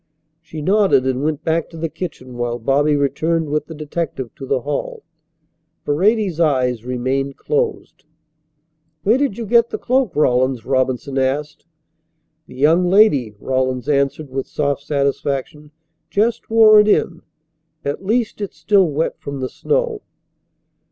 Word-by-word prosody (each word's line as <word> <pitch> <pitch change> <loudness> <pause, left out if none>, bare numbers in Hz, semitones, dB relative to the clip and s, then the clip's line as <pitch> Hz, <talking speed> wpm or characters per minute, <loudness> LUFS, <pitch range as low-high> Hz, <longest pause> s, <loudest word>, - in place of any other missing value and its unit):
She 160 -2 -8
nodded 195 -7 +3
and 130 0 -1
went 150 0 -2
back 165 0 0
to 165 - -11
the 165 +1 -2
kitchen 145 -7 -7
while 120 0 -2
Bobby 140 +5 +2
returned 150 +3 0
with 150 0 -1
the 160 - -8
detective 150 -4 -4
to 135 - -9
the 130 -1 0
hall. 145 +2 -4 0.8
Paredes's 190 +3 +1
eyes 130 -7 +1
remained 130 +2 -2
closed. 445 - -3 1.0
"Where 225 +6 +3
did 275 -8 0
you 230 - -4
get 235 +2 +3
the - - -4
cloak, 255 -7 0
Rawlins?" 130 -3 +1
Robinson 130 +1 0
asked. 145 +5 -2 0.8
"The 125 - -13
young 165 +7 +3
lady," 145 - +4
Rawlins 130 -1 -1
answered 140 0 0
with 135 0 -3
soft 140 -2 -1
satisfaction, 140 0 -2 0.4
"just 220 +3 0
wore 220 -1 +7
it 210 - +4
in. 175 -5 +1 0.6
At 140 +6 -3
least 220 +1 -1
it's 200 -6 -5
still 185 +3 +3
wet 155 +3 -2
from 140 -1 -6
the 130 -1 -3
snow." 475 -2 -1
150 Hz, 145 wpm, -19 LUFS, 135-190 Hz, 1.0 s, wore